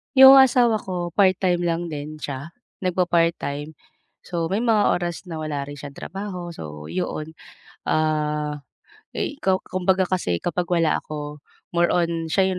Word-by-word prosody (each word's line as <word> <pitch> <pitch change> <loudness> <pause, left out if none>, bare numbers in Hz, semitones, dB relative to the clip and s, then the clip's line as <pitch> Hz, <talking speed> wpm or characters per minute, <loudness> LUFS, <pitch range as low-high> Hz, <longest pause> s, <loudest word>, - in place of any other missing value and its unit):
'Yung 265 +1 +10
asawa 240 -4 +5
ko 175 -3 -4
part-time 185 -2 +3
lang 170 -1 -1
din 150 +1 -5
siya, 140 -1 -6 0.3
nagpa-part 175 -2 +2
time. 145 +2 -5 0.5
So 170 -2 -2
may 200 +6 -1
mga 220 -3 +3
oras 175 +1 -4
na 165 - -5
wala 145 -2 -3
rin 145 - -7
siyang 145 0 -8
trabaho, 180 -1 -6
so 75 -1 -8
'yon, 160 -3 -4 0.5
ah, 150 -1 0 0.5
eh, 290 - -3
kaw 190 0 +1
kumbaga 185 +1 +1
kasi 180 - -1
kapag 175 0 -1
wala 165 -3 +2
ako, 150 -1 -7 0.3
more 175 0 +2
on 170 -2 0
siya 190 +3 +2
'yung 185 - -2
175 Hz, 155 wpm, -23 LUFS, 150-185 Hz, 0.5 s, Yung